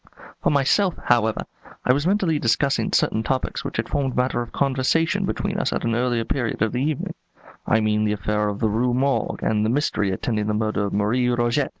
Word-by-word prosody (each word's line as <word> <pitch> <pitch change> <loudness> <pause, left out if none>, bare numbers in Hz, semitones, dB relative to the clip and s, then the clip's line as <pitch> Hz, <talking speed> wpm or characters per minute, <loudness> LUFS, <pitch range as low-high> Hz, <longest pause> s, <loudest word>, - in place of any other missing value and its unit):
For - - +2
myself, 160 +7 +2
however, 110 -2 +2 0.4
I 125 - +5
was 145 +5 0
mentally 185 -6 +1
discussing 115 0 +1
certain 110 - +2
topics 130 +2 -2
which - - -5
had - - -1
formed 135 -3 -1
matter 125 -1 0
for 120 - -12
conversation 140 +4 +1
between - - -2
us - - 0
at - - -2
an 115 - 0
earlier 120 -1 0
period 120 -5 -1
of 110 - 0
the 125 - -2
evening; 150 0 -2 0.5
I 110 - +3
mean 105 0 +1
the 105 -1 +1
affair 105 +1 -1
of 100 - -4
the 110 - +3
Rue 120 +3 +1
Morgue 135 +2 0
and 105 -1 +1
the 110 - +1
mystery 115 -6 0
attending 105 +2 -2
the 105 - 0
murder 105 -1 0
of 100 - -4
Marie 115 +5 +1
Roget. 120 +3 +1
120 Hz, 210 wpm, -23 LUFS, 110-135 Hz, 0.5 s, I